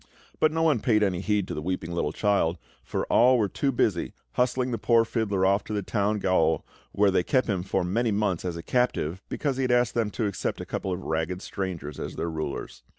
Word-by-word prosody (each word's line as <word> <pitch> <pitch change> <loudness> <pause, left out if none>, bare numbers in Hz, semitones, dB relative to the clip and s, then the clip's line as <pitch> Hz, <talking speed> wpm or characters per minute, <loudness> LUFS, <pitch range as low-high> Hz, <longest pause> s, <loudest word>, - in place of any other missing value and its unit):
But 155 - +4
no 160 +1 0
one 155 -7 +3
paid 105 -2 +2
any 95 -3 0
heed 105 -2 0
to - - -4
the 75 - -4
weeping 90 0 -3
little 85 -3 -1
child, 90 -3 +1 0.3
for - - -2
all 125 +2 +5
were 110 -3 +2
too 135 +7 -1
busy 105 -8 0 0.2
hustling 125 - 0
the 115 - -2
poor 115 -1 +4
fiddler 105 -5 0
off 100 +1 +3
to 110 - -5
the 105 -1 -1
town 105 +1 0
gaol, 90 -5 +2 0.3
where 100 -1 +3
they 95 - +3
kept 130 +7 +1
him 100 -5 -1
for 95 0 -1
many 115 +7 0
months 100 -4 0
as 90 -2 -3
a 85 - -7
captive, 100 -8 0
because 140 -3 -1
he - - 0
had 130 -1 +1
asked 120 0 +3
them 115 -3 0
to 110 - -2
accept 100 -3 -2
a - - -5
couple 95 - -3
of 90 +1 -3
ragged 80 +4 -2
strangers 90 -7 -5
as - - -5
their 85 - -2
rulers. 80 -3 -5
100 Hz, 230 wpm, -26 LUFS, 90-115 Hz, 0.3 s, all